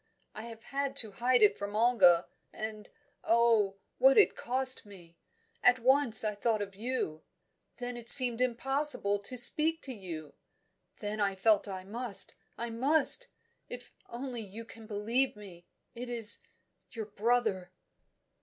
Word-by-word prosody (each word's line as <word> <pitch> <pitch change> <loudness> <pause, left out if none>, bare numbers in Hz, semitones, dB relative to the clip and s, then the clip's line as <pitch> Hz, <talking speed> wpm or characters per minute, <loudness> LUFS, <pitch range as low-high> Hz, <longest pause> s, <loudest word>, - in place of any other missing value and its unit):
I 215 - -9
have 230 -1 -12
had 275 +1 -5
to 225 -6 +4
hide 245 +2 0
it 205 -1 +2
from 205 +1 -6
Olga, 215 -7 +3 0.3
and 215 -1 -8 0.3
oh! 225 -4 +1 0.2
what 265 +2 +4
it 420 - +4
cost 260 +1 0
me! 180 -5 -17 0.5
At 245 0 +4
once 255 -2 +4
I 215 -1 -2
thought 210 +1 -2
of 200 -1 -11
you; 210 -8 -5 0.6
then 245 0 -7
it 240 -1 -4
seemed 245 -2 +7
impossible 255 -3 -1
to 225 +5 -8
speak 315 +6 +3
to 265 - -8
you; 170 -8 -10 0.7
then 210 0 -5
I 200 -2 -1
felt 210 +2 +1
I 190 -2 -8
must, 225 +1 +2 0.2
I 235 0 -6
must. 300 - +3 0.4
If 245 0 -10 0.2
only 245 0 -7
you 215 +2 -11
can 225 +1 -15
believe 230 +5 -1
me! 185 -4 -15 0.3
It 245 +1 -9
is 230 -2 -3 0.5
your 225 -2 -8
brother." 215 -3 -2
230 Hz, 145 wpm, -29 LUFS, 205-250 Hz, 0.7 s, seemed